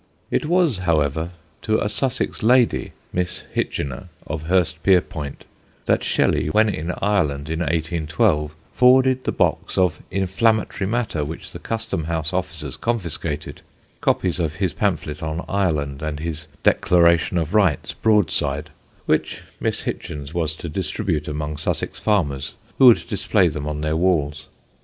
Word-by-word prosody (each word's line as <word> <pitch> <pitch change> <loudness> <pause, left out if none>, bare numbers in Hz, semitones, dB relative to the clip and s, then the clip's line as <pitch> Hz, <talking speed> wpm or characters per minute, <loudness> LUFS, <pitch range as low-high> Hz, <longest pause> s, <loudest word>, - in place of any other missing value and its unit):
It - - 0
was, 170 - +2
however, 80 -2 +1 0.3
to 110 0 +1
a - - 0
Sussex 125 +5 -2
lady, 120 +2 +3 0.2
Miss 90 0 -2
Hitchener 70 +5 -3 0.2
of 80 -1 -5
Hurstpierpoint, 90 -4 +1 0.4
that - - +2
Shelley, - - +1
when 110 +7 +3
in 85 -3 -2
Ireland 80 -8 +1
in 80 0 -2
1812, 80 -2 0 0.2
forwarded 130 +1 +4
the - - +1
box - - 0
of 90 -4 +2
inflammatory 100 +1 +1
matter 110 -8 -1
which 80 +3 -7
the - - -8
Custom 115 -8 -3
House 80 0 -2
officers 80 -7 -3
confiscated 85 -9 -3 0.4
copies 90 -1 +1
of 80 -2 -1
his 95 0 -1
pamphlet 80 -7 -1
on 80 +2 -3
Ireland 75 -8 -1
and 75 -1 -3
his 75 -1 -5 0.2
"Declaration 85 0 +4
of 80 0 -1
Rights" 95 -10 +2
broadside, 80 -8 +1 0.3
which - - 0 0.2
Miss - - -1
Hitchener 70 0 -5
was 80 -3 -1
to 85 - -7
distribute 75 -1 -2
among 75 0 -3
Sussex - - -2
farmers 70 -11 0 0.2
who 130 - +9
would 120 - +6
display 100 -4 +2
them 75 -1 -5
on 75 -1 -3
their 75 +1 0
walls. 75 -4 +1
85 Hz, 140 wpm, -22 LUFS, 75-100 Hz, 0.4 s, who